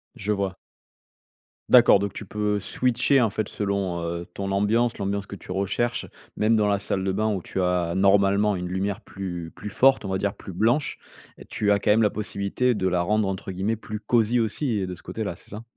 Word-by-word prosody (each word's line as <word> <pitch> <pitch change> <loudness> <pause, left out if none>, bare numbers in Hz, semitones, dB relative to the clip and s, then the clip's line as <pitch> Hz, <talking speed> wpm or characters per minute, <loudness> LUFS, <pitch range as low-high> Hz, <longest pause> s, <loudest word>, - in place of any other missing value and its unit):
Je 105 +2 -3
vois. 100 -2 -1 1.1
D'accord 100 - +7
donc 100 0 -2
tu 105 - -7
peux 105 +1 -1
switcher 125 +6 +2
en 115 - +3
fait 105 +1 -2
selon, 100 -4 -2
heu, 85 +1 -4
ton 100 0 -4
ambiance, 110 +4 +1
l'ambiance 100 0 -2
que 100 - -8
tu - - -16
recherches, 100 +5 -1 0.3
même 110 +1 +3
dans 105 -1 +2
la 100 -1 +2
salle 95 -1 -2
de 95 - +1
bain 110 +2 0
où 95 - -3
tu 95 - -3
as 90 -2 0
normalement 100 +1 +3
une 90 0 -4
lumière 95 +3 -2
plus 90 -5 -6
plus 105 - -7
forte, 130 +4 +4
on 95 - -4
va 95 - 0
dire 100 +1 -2
plus - - -10
blanche, 115 - +1 0.5
tu 105 -1 +1
as 100 - +3
quand 105 - +2
même 110 +2 +4
la 105 - +4
possibilité 105 +4 -1
de 95 -3 -2
là 90 -1 +1
rendre 105 +2 +1
entre 95 0 -4
guillemets 100 +5 -1
«plus 110 -1 -7
cosy 115 +2 +2
aussi» 115 +1 -1
et 95 - -2
de 90 - -5
ce 85 - -12
côté-là, - - -4
c'est - - -16
ça? 105 +3 -7
100 Hz, 215 wpm, -25 LUFS, 95-110 Hz, 1.1 s, D'accord